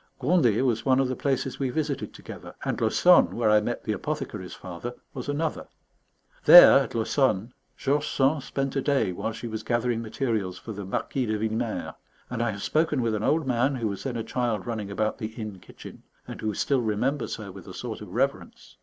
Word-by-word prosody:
Gondet 130 Hz, -, +3 dB
was 115 Hz, -3 st, +1 dB
one 130 Hz, +1 st, +3 dB
of 135 Hz, -, +2 dB
the 130 Hz, -, -2 dB
places 135 Hz, -1 st, -1 dB
we 135 Hz, -2 st, 0 dB
visited 145 Hz, 0 st, -2 dB
together; -, -, -10 dB
and -, -, -1 dB
Laussonne, -, -, +5 dB
where 105 Hz, -, +2 dB
I 105 Hz, 0 st, +5 dB
met 120 Hz, +3 st, -3 dB
the 110 Hz, -, -2 dB
apothecary's 105 Hz, -5 st, -4 dB
father, 95 Hz, +8 st, -7 dB, 0.2 s
was -, -, -6 dB
another. 155 Hz, +2 st, -2 dB, 0.8 s
There, 175 Hz, -5 st, +10 dB
at 135 Hz, -4 st, -4 dB
Laussonne, 115 Hz, -1 st, +1 dB, 0.2 s
George 145 Hz, +2 st, 0 dB
Sand 140 Hz, +2 st, +2 dB
spent 135 Hz, +1 st, -3 dB
a 135 Hz, -, +1 dB
day 135 Hz, -9 st, +1 dB
while 100 Hz, +5 st, -3 dB
she 115 Hz, +2 st, -7 dB
was 110 Hz, -1 st, -4 dB
gathering 120 Hz, +1 st, 0 dB
materials 110 Hz, -5 st, -2 dB
for 110 Hz, -, -8 dB
the 100 Hz, -1 st, -6 dB
"Marquis 125 Hz, +6 st, -2 dB
de 110 Hz, 0 st, 0 dB
Villemer"; 110 Hz, +1 st, -2 dB, 0.4 s
and 120 Hz, -2 st, -2 dB
I 120 Hz, -, +1 dB
have 100 Hz, -2 st, -5 dB
spoken 155 Hz, -4 st, +1 dB
with 115 Hz, -1 st, 0 dB
an 105 Hz, -, -1 dB
old 150 Hz, +6 st, +1 dB
man, 130 Hz, +2 st, +1 dB
who 115 Hz, -4 st, -1 dB
was 100 Hz, -, -5 dB
then 125 Hz, -3 st, -3 dB
a 115 Hz, -, -2 dB
child 115 Hz, -5 st, -2 dB
running 110 Hz, -4 st, -4 dB
about 110 Hz, +2 st, -1 dB
the 110 Hz, -, -3 dB
inn 105 Hz, -4 st, -6 dB
kitchen, -, -, -12 dB, 0.3 s
and -, -, -8 dB
who 110 Hz, -2 st, -2 dB
still 135 Hz, -3 st, +1 dB
remembers 120 Hz, +5 st, -1 dB
her 105 Hz, -3 st, -8 dB
with 95 Hz, -1 st, -12 dB
a -, -, -8 dB
sort -, -, -6 dB
of -, -, -9 dB
reverence. -, -, -3 dB
120 Hz, 205 wpm, -26 LUFS, 110-135 Hz, 0.8 s, There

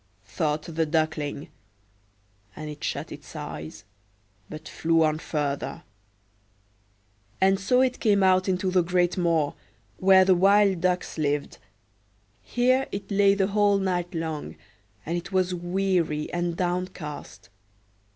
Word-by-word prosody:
thought 150 Hz, +10 st, -2 dB
the 165 Hz, -1 st, -2 dB
Duckling; 155 Hz, -1 st, -1 dB, 1.1 s
and 155 Hz, -1 st, -6 dB
it 150 Hz, -, -11 dB
shut -, -, -3 dB
its -, -, -11 dB
eyes, 80 Hz, +1 st, -7 dB, 0.7 s
but 155 Hz, 0 st, -9 dB
flew 165 Hz, 0 st, +1 dB
on 155 Hz, 0 st, +1 dB
further; 145 Hz, -3 st, -3 dB, 1.6 s
and 190 Hz, 0 st, +3 dB
so 250 Hz, +6 st, +3 dB
it 255 Hz, -1 st, +1 dB
came 205 Hz, -4 st, +3 dB
out 185 Hz, 0 st, +3 dB
into 185 Hz, 0 st, 0 dB
the 180 Hz, 0 st, +4 dB
great 175 Hz, 0 st, +1 dB
moor, 165 Hz, -5 st, +1 dB, 0.4 s
where 190 Hz, 0 st, +6 dB
the 190 Hz, -, +5 dB
wild 195 Hz, 0 st, +4 dB
ducks 180 Hz, -2 st, -1 dB
lived. 145 Hz, -1 st, -1 dB, 0.8 s
Here 255 Hz, +2 st, +1 dB
it 200 Hz, 0 st, -6 dB
lay 200 Hz, 0 st, +4 dB
the 195 Hz, -1 st, +2 dB
whole 205 Hz, -1 st, +3 dB
night 180 Hz, -2 st, -2 dB
long; 160 Hz, -2 st, -4 dB, 0.5 s
and 170 Hz, +2 st, -1 dB
it 175 Hz, -, -11 dB
was 185 Hz, -1 st, +1 dB
weary 175 Hz, -3 st, -1 dB
and 175 Hz, -1 st, -2 dB
downcast. 180 Hz, -4 st, -4 dB
175 Hz, 130 wpm, -26 LUFS, 155-195 Hz, 1.6 s, where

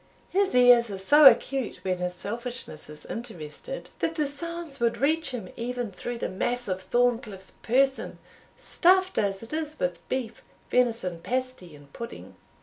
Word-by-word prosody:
His 390 Hz, -7 st, +1 dB
ears 245 Hz, -2 st, +6 dB
are 195 Hz, -, -4 dB
so 290 Hz, +10 st, +7 dB
acute 270 Hz, -2 st, +3 dB
when 185 Hz, -1 st, -1 dB
his 180 Hz, 0 st, -3 dB
selfishness 235 Hz, -, -6 dB
is 150 Hz, 0 st, -9 dB
interested, 225 Hz, -, -7 dB
that 325 Hz, -, -1 dB
the 305 Hz, -2 st, +1 dB
sounds 320 Hz, 0 st, -4 dB
would 235 Hz, -1 st, +1 dB
reach 315 Hz, +4 st, +1 dB
him 225 Hz, -8 st, -6 dB
even 245 Hz, -2 st, -3 dB
through 240 Hz, +6 st, -5 dB
the -, -, -2 dB
mass 245 Hz, +6 st, -2 dB
of 185 Hz, -1 st, -2 dB
Thorncliff's 230 Hz, -5 st, 0 dB
person, 270 Hz, +3 st, +1 dB, 0.4 s
stuffed 375 Hz, +1 st, +3 dB
as 195 Hz, 0 st, -1 dB
it 230 Hz, -, -9 dB
is 310 Hz, -1 st, -3 dB
with 175 Hz, -1 st, -1 dB
beef, 240 Hz, -4 st, -3 dB, 0.3 s
venison 230 Hz, -9 st, +1 dB
pasty, 250 Hz, -7 st, -4 dB
and 145 Hz, -1 st, -17 dB
pudding." 235 Hz, 0 st, -8 dB
240 Hz, 155 wpm, -27 LUFS, 190-275 Hz, 0.4 s, so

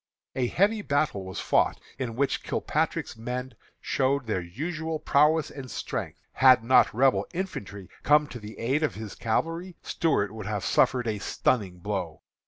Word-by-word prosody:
A 125 Hz, -2 st, +1 dB
heavy 205 Hz, -, +2 dB
battle 140 Hz, -, 0 dB
was 95 Hz, -1 st, -6 dB
fought, -, -, +2 dB, 0.2 s
in 120 Hz, -4 st, -3 dB
which 140 Hz, +2 st, 0 dB
Kilpatrick's -, -, -1 dB
men 125 Hz, +3 st, -5 dB, 0.3 s
showed 135 Hz, 0 st, 0 dB
their 110 Hz, -5 st, -1 dB
usual 155 Hz, -, -4 dB
prowess 150 Hz, +1 st, +3 dB
and 135 Hz, -3 st, -8 dB
strength. -, -, -4 dB
Had 130 Hz, -3 st, +6 dB
not 130 Hz, +3 st, +5 dB
Rebel 130 Hz, +3 st, +2 dB
infantry 100 Hz, -, -5 dB
come 150 Hz, +1 st, +4 dB
to 120 Hz, -, -7 dB
the 105 Hz, 0 st, -10 dB
aid 135 Hz, +6 st, 0 dB
of 155 Hz, -, 0 dB
his 110 Hz, -1 st, -7 dB
cavalry, 165 Hz, +10 st, -2 dB
Stuart 140 Hz, -, 0 dB
would 110 Hz, -2 st, -7 dB
have 105 Hz, -3 st, -2 dB
suffered 125 Hz, -2 st, +3 dB
a 105 Hz, -2 st, -1 dB
stunning 100 Hz, -2 st, 0 dB
blow. 90 Hz, -4 st, -4 dB
130 Hz, 160 wpm, -27 LUFS, 105-150 Hz, 0.3 s, Had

